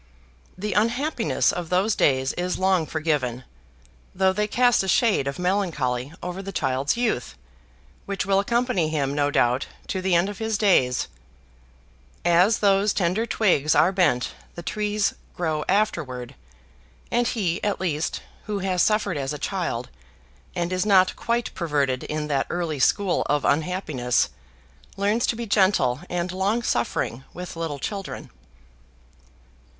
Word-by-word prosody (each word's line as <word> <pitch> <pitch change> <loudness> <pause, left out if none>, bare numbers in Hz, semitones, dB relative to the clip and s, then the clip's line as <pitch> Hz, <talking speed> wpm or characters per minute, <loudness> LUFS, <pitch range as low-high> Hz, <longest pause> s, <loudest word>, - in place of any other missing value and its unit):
The 205 +1 -3
unhappiness 235 +4 +1
of 175 -2 -5
those 190 +4 +2
days 130 -1 +2
is 180 +1 -2
long 185 -4 +2
forgiven, 145 -7 -1 0.7
though 190 0 +3
they 210 +2 0
cast 245 +2 +3
a 190 - -3
shade 195 - +3
of 140 - -3
melancholy 155 -9 -1
over 180 +2 -4
the 195 0 -6
child's 135 - 0
youth, 225 - -1 0.7
which 200 -1 -2
will 195 0 +3
accompany 235 -5 +1
him, 140 -3 -1
no 145 0 +1
doubt, 125 -1 +1 0.2
to 190 - -2
the 185 -1 +2
end 170 +3 +3
of 205 -1 -6
his 220 -1 -1
days: 135 - +3 1.2
as 180 +5 +4
those 200 0 +3
tender 195 +5 0
twigs 180 -10 +2
are 180 - +5
bent 175 -10 +1 0.2
the 170 - -7
trees 210 +2 0 0.2
grow 155 -3 -1
afterward; 155 - 0 0.8
and 240 0 +2
he, 190 -8 -1
at 205 -1 0
least, 160 -4 -2 0.2
who 210 -1 -2
has 185 -2 0
suffered 210 -5 +2
as 135 +1 -2
a - - -4
child, 155 -9 -3 0.7
and 175 0 -1
is 185 - +1
not 190 -3 +4
quite 235 0 -1
perverted 145 -6 -1
in 155 0 -3
that 140 -3 0
early 170 -4 -2
school 195 +7 +2
of 145 -1 +1
unhappiness, 150 -5 +1 0.7
learns 205 +4 +1
to - - 0
be 235 +1 -4
gentle 190 - +2
and 175 0 -2
long 200 +6 0
suffering 120 - -1
with 180 0 -7
little 165 -3 -3
children. 195 +7 -6
180 Hz, 145 wpm, -24 LUFS, 150-205 Hz, 1.2 s, are